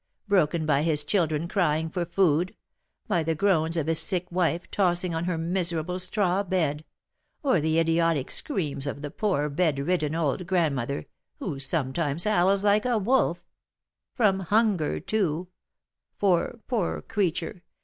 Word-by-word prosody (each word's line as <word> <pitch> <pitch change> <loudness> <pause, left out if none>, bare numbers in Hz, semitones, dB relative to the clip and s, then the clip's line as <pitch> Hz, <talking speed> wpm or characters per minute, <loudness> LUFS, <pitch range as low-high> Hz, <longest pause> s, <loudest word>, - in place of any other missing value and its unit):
broken 170 -5 +2
by 145 -2 +2
his 155 -2 +1
children 160 -1 0
crying 160 -4 +1
for 175 +2 -3
food, 175 -1 +1 0.5
by 170 - +1
the 160 0 -1
groans 165 -2 +2
of 160 - 0
his 160 0 +3
sick 180 -3 +2
wife 175 -1 0
tossing 180 -2 +1
on 165 +1 -2
her 180 -2 -1
miserable 175 0 -1
straw 190 0 +1
bed, 160 -6 -1 0.6
or 260 - +2
the 160 +1 +1
idiotic 165 -3 +1
screams 150 - -2
of 140 +1 -5
the 145 - -5
poor 185 -9 0
bedridden 155 +1 0
old 165 +2 -1
grandmother, 140 - 0 0.3
who 135 - -4
sometimes 145 +2 0
howls 200 -1 +2
like 210 +1 +3
a 240 -2 +2
wolf, 195 -6 +1 0.7
from 205 -6 +3
hunger, 200 -3 +1
too, 180 -2 -1 0.7
for, 195 +4 +1
poor 220 -9 -2
creature! 185 -3 -2
170 Hz, 140 wpm, -26 LUFS, 155-190 Hz, 0.7 s, his